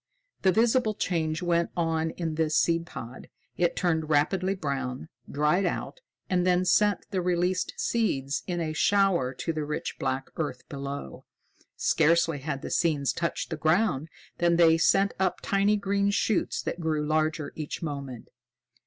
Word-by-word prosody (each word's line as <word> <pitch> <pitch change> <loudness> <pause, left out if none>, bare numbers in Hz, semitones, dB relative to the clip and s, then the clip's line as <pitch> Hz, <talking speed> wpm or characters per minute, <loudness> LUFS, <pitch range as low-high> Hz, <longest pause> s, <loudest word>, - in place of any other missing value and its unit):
The 190 - +4
visible 225 +2 +2
change 160 -2 -1
went 170 -1 +1
on 165 -1 0
in 165 -3 -2
this 155 0 +1
seed 170 0 +2
pod. 120 -3 -9 0.3
It 175 -1 +1
turned 160 -3 0
rapidly 185 +6 +2
brown, 140 -4 -4 0.2
dried 150 +6 +2
out, - - -4 0.3
and 180 -1 +1
then 180 0 +2
sent 205 +2 +3
the 190 -2 0
released 180 +1 0
seeds 140 - 0
in 175 -1 -2
a 160 -2 -2
shower 190 -6 +2
to 165 - -3
the 155 -1 -2
rich 150 +1 -4
black 135 0 -2
earth 155 -2 -4
below. 140 - -6 0.5
Scarcely 165 -1 +2
had 140 0 -4
the - - -5
seeds 145 -7 +1
touched 170 +3 -3
the 160 - -2
ground 160 -2 +1 0.3
than 170 -1 +3
they 165 -1 +6
sent 195 +4 +3
up 185 -2 +2
tiny 200 +1 +2
green 200 0 0
shoots 200 0 0
that - - -4
grew 155 -2 -1
larger 155 0 0
each 155 +2 -5
moment. 140 -6 -6
165 Hz, 155 wpm, -27 LUFS, 150-185 Hz, 0.5 s, they